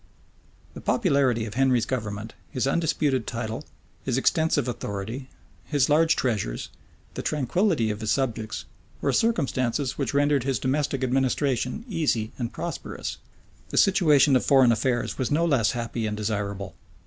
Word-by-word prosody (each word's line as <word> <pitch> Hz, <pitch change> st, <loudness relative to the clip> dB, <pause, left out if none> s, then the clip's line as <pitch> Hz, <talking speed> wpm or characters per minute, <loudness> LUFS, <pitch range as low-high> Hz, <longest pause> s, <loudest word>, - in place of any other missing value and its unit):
The -, -, -9 dB
popularity 140 Hz, -, +2 dB
of 105 Hz, -, -7 dB
Henry's 130 Hz, -3 st, +2 dB
government, 110 Hz, -3 st, -4 dB, 0.2 s
his 130 Hz, -5 st, -1 dB
undisputed 140 Hz, -4 st, +1 dB
title, 115 Hz, +2 st, -4 dB, 0.4 s
his 130 Hz, -2 st, 0 dB
extensive 150 Hz, -1 st, +2 dB
authority, 115 Hz, +3 st, -5 dB, 0.3 s
his 145 Hz, -2 st, +1 dB
large 160 Hz, +2 st, +4 dB
treasures, 105 Hz, -, -2 dB, 0.4 s
the -, -, -4 dB
tranquillity 150 Hz, -, +1 dB
of 105 Hz, +1 st, -5 dB
his 110 Hz, -, -2 dB
subjects, 115 Hz, -5 st, -1 dB, 0.3 s
were -, -, 0 dB
circumstances 135 Hz, -, 0 dB
which 140 Hz, -1 st, -1 dB
rendered 145 Hz, -2 st, +3 dB
his 135 Hz, -2 st, 0 dB
domestic 135 Hz, +2 st, -1 dB
administration 130 Hz, -, 0 dB
easy 150 Hz, -, 0 dB
and 120 Hz, -2 st, -2 dB
prosperous: -, -, -5 dB, 0.5 s
the -, -, -4 dB
situation 150 Hz, -8 st, +5 dB
of 130 Hz, -, +3 dB
foreign 135 Hz, -4 st, +5 dB
affairs 120 Hz, +1 st, 0 dB
was 130 Hz, -, 0 dB
no 160 Hz, +3 st, +2 dB
less 130 Hz, -10 st, +2 dB
happy 115 Hz, -1 st, -3 dB
and 105 Hz, 0 st, -3 dB
desirable. 100 Hz, -2 st, -3 dB
130 Hz, 140 wpm, -25 LUFS, 115-145 Hz, 0.5 s, situation